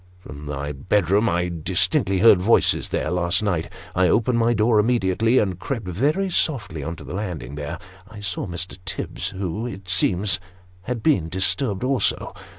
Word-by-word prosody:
From 75 -5 -11
my 70 0 -4
bedroom 100 +8 +1
I 90 +1 0
distinctly 90 +2 +1
heard 110 -5 +7
voices 110 +5 +3
there, 75 - -1
last 90 +3 +1
night. 90 -6 -1 0.2
I 90 0 +3
opened 115 +4 +2
my 115 +1 +3
door 110 0 +3
immediately, 115 +1 +2
and 95 -6 +1
crept 120 -3 -4
very 150 - 0
softly 105 - 0
on 85 +3 -4
to - - -11
the - - -8
landing; 90 -7 -4
there 75 0 -5 0.3
I 105 - -10
saw 100 -2 -3
Mr. 90 +2 -6
Tibbs, 95 - -4
who, 100 +5 -4
it 95 -5 -8
seems, 90 0 +1 0.5
had 125 -3 -3
been 95 - +2
disturbed 100 +4 0
also. 130 0 0
95 Hz, 165 wpm, -23 LUFS, 90-115 Hz, 0.5 s, heard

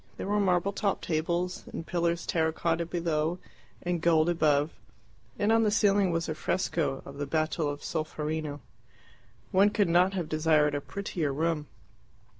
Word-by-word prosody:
There - - -4
were 205 +1 +1
marble 190 0 +2
topped 200 -1 -1
tables, 170 +3 -1
and 165 - -6
pillars 170 -1 -1
terra 160 -1 +1
cotta 165 +1 -1
below 165 -1 -1 0.5
and 175 -1 -1
gold 165 -1 +4
above, 155 -3 +2 0.7
and 210 +1 +2
on 225 0 +5
the 215 - +3
ceiling 205 -2 +3
was 165 -1 -1
a 155 - -1
fresco 155 -3 -1
of 140 +1 -10
the 145 - -2
battle 155 +1 0
of 145 0 -6
Solferino. 155 -2 -3 0.9
One 200 +1 +5
could 205 -3 +1
not 180 +3 +4
have 180 -4 -2
desired 155 -1 +2
a 145 - -1
prettier 175 -4 -3
room. 155 +1 -1
165 Hz, 160 wpm, -29 LUFS, 155-180 Hz, 0.9 s, on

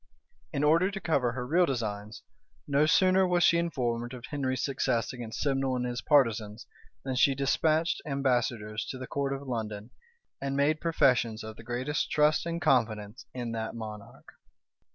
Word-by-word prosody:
In 140 -1 -1
order 165 +5 +4
to 195 -1 -5
cover 135 -10 0
her 125 0 -4
real 170 +6 +3
designs, 105 -4 -4 0.4
no 145 +1 +3
sooner 185 +3 +4
was 175 -1 +2
she 170 - +5
informed 120 -7 -2
of 125 0 -9
Henry's 130 -3 -2
success 130 -4 0
against 115 -3 -6
Simnel 135 -2 0
and 125 0 -1
his 120 0 -3
partisans, 115 -7 +2 0.4
than 135 - -3
she 135 +2 +3
despatched 155 +4 +1
ambassadors 120 -7 -1
to 130 - -6
the 130 - -6
court 140 +1 -2
of 140 0 -5
London, 110 -2 -4 0.5
and 140 0 -2
made 155 +2 +2
professions 125 -9 +2
of 110 0 -8
the - - -12
greatest 125 +5 -2
trust 150 +2 +2
and 170 0 -2
confidence 110 -5 0
in 120 -2 -4
that 110 0 -4
monarch. 105 -2 -9
130 Hz, 165 wpm, -29 LUFS, 115-150 Hz, 0.5 s, she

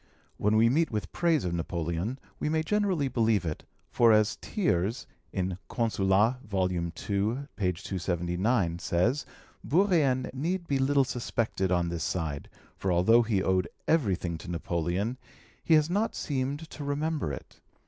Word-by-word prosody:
When 105 +1 +2
we 110 +1 +5
meet 160 +7 +2
with 105 -5 -4
praise 165 - +1
of 85 - -1
Napoleon, 85 +6 -2 0.2
we - - -1
may 160 0 +1
generally 190 -6 +1
believe 115 -6 +1
it, 80 -2 -4 0.3
for, 115 -2 +5
as 110 -1 +4
Thiers 110 - -1 0.6
(Consulat., 110 0 +2
ii. 90 -3 0
279) 95 - -1
says, 110 +13 0 0.4
Bourrienne 155 -7 +2
need 170 +7 -2
be 140 -1 +1
little 140 +1 +3
suspected 115 -6 -1
on 90 -1 +2
this 85 -2 -3
side, 80 -4 -3 0.3
for 95 - -1
although 95 +7 +5
he 110 -5 0
owed 95 -1 +2 0.2
everything 95 - +1
to 90 - -9
Napoleon, 90 +7 -2 0.4
he 160 - +5
has 155 -1 +4
not 205 +6 0
seemed 140 +2 -2
to 150 - -7
remember 145 - -1
it. 70 - -9
110 Hz, 140 wpm, -28 LUFS, 90-140 Hz, 0.6 s, we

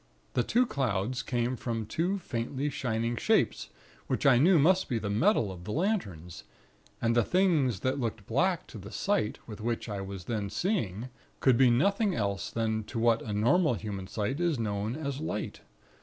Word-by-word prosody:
The - - +2
two 250 +2 +2
clouds 125 - -1
came 120 0 -1
from 115 -3 -3
two 175 - -1
faintly 135 -2 -3
shining 115 -4 -1
shapes, - - +1 0.4
which - - -1
I 125 -3 +6
knew 175 +6 +6
must 180 +6 +3
be 120 - 0
the 105 -2 -3
metal 110 - +2
of 90 -2 -9
the 105 - -5
lanterns; 100 - -2 0.6
and 115 0 +1
the 120 - +4
things 155 - +2
that 130 +2 0
looked 115 -4 -3
black 175 - +1
to 110 - -9
the 100 +2 -10
sight 200 - 0
with 105 -2 -9
which 115 +1 -2
I 100 -3 -4
was 95 -2 -7
then 105 -2 -2
seeing, 125 - -1 0.3
could 130 -3 +4
be 130 +1 +5
nothing 200 - +2
else 100 -4 -2
but 110 0 -2
what 115 0 +3
to 110 - -6
normal 120 - +3
human 100 -3 -5
sight 105 - -2
is 170 -4 +1
known 105 0 -2
as 140 -3 -4
light. 125 -9 -4
120 Hz, 180 wpm, -29 LUFS, 105-150 Hz, 0.6 s, I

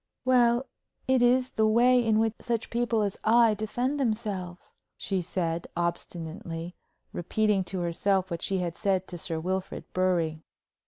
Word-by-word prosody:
"Well, 245 0 +4 0.4
it 260 -1 +3
is 250 +1 +3
the 220 0 +2
way 245 +3 +5
in 220 -2 +2
which 220 0 +2
such 230 -2 -2
people 235 -2 +1
as 200 -2 -2
I 230 0 +5
defend 245 +7 -2
themselves," 210 -7 -3 0.2
she 190 -2 -2
said, 170 -1 -2
obstinately, 170 0 -4 0.4
repeating 205 +3 +1
to 185 -1 -4
herself 185 +2 0
what 170 - -3
she 195 - 0
had 175 -2 -2
said 190 -3 0
to 175 - -6
Sir 165 -1 -3
Wilfrid 185 +3 -3
Bury. 170 -4 +1
195 Hz, 150 wpm, -28 LUFS, 175-235 Hz, 0.4 s, way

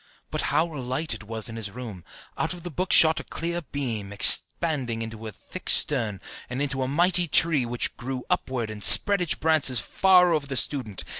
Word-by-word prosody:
But - - -2
how 160 - +1
light 130 +2 -3
it 115 - -8
was 110 0 -5
in 115 -1 -7
his 110 -3 -5
room! 105 -5 -10 0.3
Out - - -3
of 175 - -13
the 175 - -7
book 180 +5 -4
shot 160 -1 +5
a - - -8
clear 170 +1 -4
beam, 120 -10 -5
expanding 120 +2 +1
into 110 0 -9
a - - -7
thick - - -9
stem, 115 -9 +2 0.3
and 125 +1 -5
into 140 -2 -2
a 130 - -2
mighty 175 +5 +1
tree, 150 -5 +2
which 120 0 -2
grew 125 +1 -6
upward 120 -4 -3
and 105 -2 -6
spread 200 - +7
its 175 - +1
branches 155 -6 +1
far 180 +2 +3
over 150 -3 -2
the 135 -2 -2
student. 115 -6 0
130 Hz, 200 wpm, -24 LUFS, 115-160 Hz, 0.3 s, spread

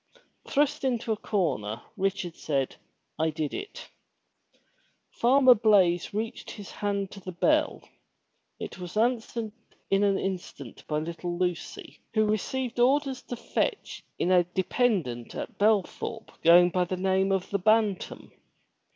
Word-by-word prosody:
Thrust 295 +1 +1
into 240 -3 0
a - - +2
corner, 155 - -1 0.2
Richard 190 -3 -2
said, 135 -4 -2 0.4
*'I 160 0 +2
did 155 -2 -3
it." 410 +1 -7 1.2
Farmer 255 +1 +6
Blaize 200 -6 +3
reached 220 +2 -4
his 205 -3 -9
hand 200 -1 -2
to 200 - -9
the 185 -1 -7
bell. 305 - +1 0.8
It - - -7
was 180 +2 -6
answered 230 -1 0 0.4
in 195 +1 +4
an 200 -1 +3
instant 175 - -6
by 150 - -1
little 170 +2 -4
Lucy, 180 -2 -3 0.2
who 215 0 +4
received 240 +4 -2
orders 270 +1 +2
to 245 - -6
fetch - - -2
in 180 - +1
a 180 -1 +6
dependent 180 - -1
at - - -6
Belthorpe 215 +1 0
going 175 +2 +7
by 180 0 +1
the 185 +1 -3
name 190 +1 +1
of 190 -1 -1
the 200 - +1
Bantam. 215 0 +1
195 Hz, 135 wpm, -27 LUFS, 175-225 Hz, 1.2 s, going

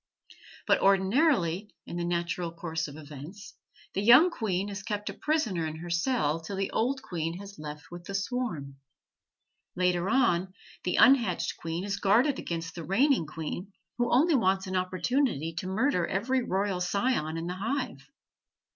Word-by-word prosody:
But - - +4
ordinarily, 195 - +2
in - - -7
the 175 - -1
natural 170 0 -1
course 165 -1 -3
of 145 +1 -10
events, 155 +6 -10 0.4
the 195 - -1
young 250 - +7
queen 200 - -1
is 200 0 -5
kept 210 -1 -3
a - - -10
prisoner 225 - 0
in 155 - -5
her 170 +2 -7
cell 170 - +1
till 165 +5 -6
the 195 0 -2
old 265 +4 0
queen 165 -1 -3
has 200 -2 -10
left 150 +1 -8
with 175 0 -9
the 200 - -5
swarm. 195 - -3 1.0
Later 180 0 +1
on, 190 -8 +2 0.3
the 180 - +1
unhatched 240 -9 +4
queen 165 +2 -4
is 200 0 -2
guarded 245 +8 +3
against 165 -1 -4
the 170 - -7
reigning 235 - +2
queen, 165 +5 -6 0.3
who 240 0 +1
only 310 +7 +4
wants 190 -6 +2
an 185 0 -4
opportunity 185 - 0
to 165 +3 -4
murder 190 -2 +1
every 255 +7 0
royal 195 -4 -1
scion 180 -3 0
in 165 - -4
the 175 - -3
hive. 245 - -2
190 Hz, 165 wpm, -29 LUFS, 170-230 Hz, 1.0 s, young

